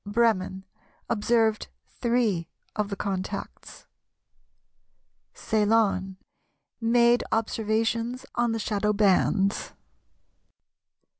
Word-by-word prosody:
Bremen, 205 -3 0 0.5
Observed 225 0 +1 0.2
three 230 -9 0 0.3
of 210 -2 -1
the 200 - -3
contacts. 190 -2 -5 1.5
Ceylon, 210 -3 +1 0.6
Made 235 +1 +4
observations 225 +3 -1
on 240 -1 +1
the 225 - -1
shadow 210 -1 0
bands. 200 0 +2
220 Hz, 70 wpm, -26 LUFS, 200-230 Hz, 1.5 s, Made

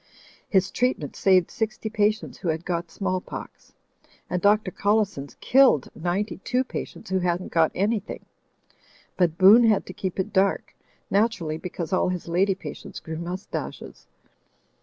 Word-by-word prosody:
His 190 -4 +2
treatment 250 - -1
saved 185 -3 +3
sixty 220 0 -3
patients 215 0 0
who 180 - -5
had 160 +1 -1
got 170 -2 -2
small 185 -2 -2
pox; - - -10 0.6
and 180 - 0
Dr. 205 0 +3
Collison's 200 -10 0
killed 260 - +4
ninety 180 +5 -2
two 250 +6 0
patients 225 -5 -7
who 190 - +2
hadn't 175 0 -1
got 165 -1 +3
anything. 205 +2 -2 0.9
But 170 -3 +1
Boone 205 +5 +8
had 215 -3 +3
to 185 - -8
keep 190 0 -4
it 195 +3 -2
dark; 195 0 +1 0.4
naturally, 195 -7 +1
because 175 0 -5
all 185 - +2
his 180 -2 -4
lady 185 +3 +2
patients 150 -6 -8
grew 160 0 -6
mustaches. 180 +3 -6
190 Hz, 145 wpm, -25 LUFS, 175-210 Hz, 0.9 s, Boone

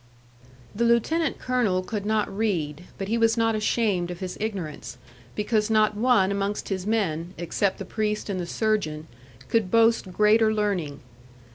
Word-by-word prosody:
The 220 +3 -1
lieutenant 255 +8 +2
colonel 230 -8 0
could 205 +1 -4
not 215 -2 0
read, 180 -7 -2
but 195 - -4
he 230 +3 0
was 225 0 +3
not 225 0 +2
ashamed 215 -4 0
of 175 -1 -6
his 185 -2 -5
ignorance, 195 -9 -5 0.4
because 210 0 0
not 215 -1 +3
one 215 -4 +3
amongst 200 +1 -2
his 190 -1 -3
men, 180 -5 -1
except 175 +3 -1
the 195 - -6
priest 210 +1 -2
and 195 -3 -2
the 175 - -4
surgeon, 175 -8 -1 0.4
could 225 -5 +1
boast 230 -3 +3
greater 215 +3 +4
learning. 195 -9 -1
210 Hz, 155 wpm, -25 LUFS, 185-225 Hz, 0.4 s, greater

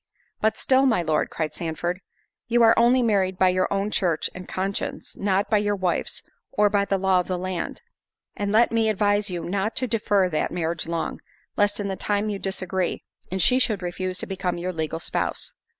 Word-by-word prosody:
"But 220 +1 +1
still, 265 +1 +3
my 225 -9 +2
Lord," 155 -2 +1
cried 155 -2 -3
Sandford, 175 +2 -3 0.5
"you 240 0 +4
are 225 - +7
only 245 +2 +4
married 195 -4 +1
by 185 0 +5
your 185 0 +1
own 200 +1 0
church 175 -7 0
and 180 0 -9
conscience, 195 +1 -3
not 195 +1 +1
by 215 - +3
your 205 0 0
wife's, 185 -3 -1 0.3
or 210 -6 +3
by 200 -1 +2
the 195 - +1
law 190 -1 +3
of 180 - -2
the 185 - -1
land; 185 -1 -4 0.5
and 205 0 -2
let 225 +3 +4
me 225 -1 +2
advise 205 0 +2
you 175 -2 -4
not 195 +5 -1
to 255 - +1
defer 210 -5 +2
that 155 -4 -1
marriage 165 -1 -2
long, 165 -1 -3 0.3
lest 205 0 +2
in 205 - -2
the 190 - -2
time 205 +2 -1
you 200 - -4
disagree, 190 -2 -2 0.3
and 190 -1 +1
she 255 0 +5
should 215 -7 +1
refuse 185 +1 -3
to - - -5
become 185 -2 -2
your 180 +1 -3
legal 160 0 -3
spouse." - - -2
195 Hz, 200 wpm, -24 LUFS, 180-210 Hz, 0.5 s, are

